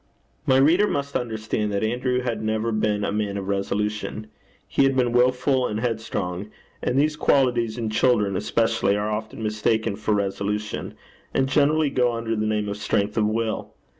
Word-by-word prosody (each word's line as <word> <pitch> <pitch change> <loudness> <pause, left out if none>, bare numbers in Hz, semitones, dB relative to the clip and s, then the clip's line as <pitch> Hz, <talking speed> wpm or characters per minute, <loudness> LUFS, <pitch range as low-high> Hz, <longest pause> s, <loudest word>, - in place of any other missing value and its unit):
My 130 -1 +5
reader 165 +10 +5
must 140 -4 -3
understand 110 -2 -2
that 100 +1 -1
Andrew 125 +3 0
had 120 -3 -2
never 110 +1 -1
been 105 -1 0
a - - 0
man 105 -1 -1
of 95 -1 -5
resolution. 105 +2 -2 0.4
He - - +1
had 135 0 +3
been 125 -2 +2
wilful 125 +2 +2
and 105 - -3
headstrong; 105 -5 -3 0.3
and 125 - 0
these 150 +2 +2
qualities, 120 -6 +2
in 115 -2 -2
children 110 -4 +2
especially, 100 -1 +1
are 105 +1 -1
often 110 +1 -4
mistaken 110 0 0
for 110 0 0
resolution, 100 +1 -2 0.4
and 135 - +2
generally 150 +1 +3
go 125 -2 +2
under 115 -1 -2
the 110 0 -1
name 105 -1 0
of 100 0 -3
strength 105 0 0
of 105 -2 +2
will. 110 0 -2
110 Hz, 170 wpm, -24 LUFS, 105-125 Hz, 0.4 s, My